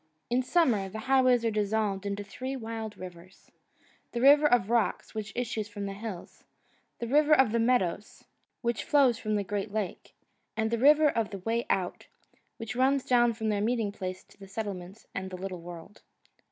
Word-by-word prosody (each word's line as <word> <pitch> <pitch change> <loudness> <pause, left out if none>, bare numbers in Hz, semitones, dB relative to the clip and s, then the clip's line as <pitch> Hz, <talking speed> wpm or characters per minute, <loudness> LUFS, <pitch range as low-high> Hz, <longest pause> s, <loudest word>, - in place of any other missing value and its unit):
In 250 +1 +3
summer 250 - +2
the 220 +3 -6
highways 255 -1 +3
are 225 - +2
dissolved 205 -1 -1
into 200 0 -3
three 255 +7 -5
wild 225 -3 -6
rivers 185 0 -12 0.6
the 240 - -2
River 290 +3 +7
of 240 -6 +2
Rocks, 235 -2 0
which 215 -1 -5
issues 225 -3 -2
from 205 -1 -6
the 195 - -4
hills; 205 -3 -8 0.5
the 235 - -4
River 300 +4 +5
of 265 -6 +4
Meadows, 230 -5 0 0.4
which 235 -1 -1
flows 265 -6 +3
from 215 -1 -1
the 205 - 0
great 205 +1 -3
lake; 210 -3 -4 0.4
and 220 0 0
the 235 - 0
River 300 +4 +6
of 230 -5 -1
the 200 - -6
Way 225 +5 -2
Out, 180 -2 -1 0.5
which 225 -1 -6
runs 265 +1 +2
down 240 -2 +4
from 220 -1 -2
their 205 -1 0
meeting 225 -2 0
place 185 -2 -6
to - - -23
the 195 - -11
settlements 195 -1 -6
and 190 +1 -4
the 185 - -7
little 185 -1 -6
world. 175 +3 -11
220 Hz, 180 wpm, -29 LUFS, 200-245 Hz, 0.6 s, River